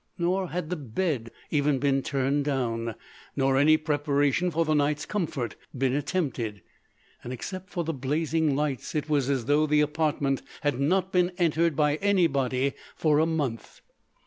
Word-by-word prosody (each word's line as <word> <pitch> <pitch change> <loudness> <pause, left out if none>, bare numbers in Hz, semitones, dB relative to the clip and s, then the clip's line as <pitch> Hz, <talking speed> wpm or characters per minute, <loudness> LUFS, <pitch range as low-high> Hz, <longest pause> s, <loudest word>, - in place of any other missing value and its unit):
Nor 180 +1 0
had 175 -1 -4
the - - +1
bed 140 -3 -2 0.2
even 145 -2 +2
been 135 0 +1
turned 140 +1 0
down—nor 130 +1 -2
any 150 +3 +5
preparation 145 +2 +1
for 165 0 0
the 155 - +1
night's 150 0 +1
comfort 155 - -3 0.2
been 130 0 +1
attempted. 135 - -2 0.6
And, 120 - -6
except 185 +9 -6
for 175 - -2
the 165 0 -2
blazing 150 +2 0
lights, 140 -1 -2
it 150 0 -1
was 145 -3 +1
as 130 -4 0
though 150 +2 +3
the 150 0 +4
apartment 150 -2 0 0.2
had 145 -4 0
not 185 +6 +1
been 180 -1 +2
entered 170 -2 +2
by 150 0 +2
anybody 140 -9 +1 0.2
for 150 -2 +3
a 160 - +3
month. 145 -8 -3
145 Hz, 155 wpm, -27 LUFS, 135-160 Hz, 0.6 s, any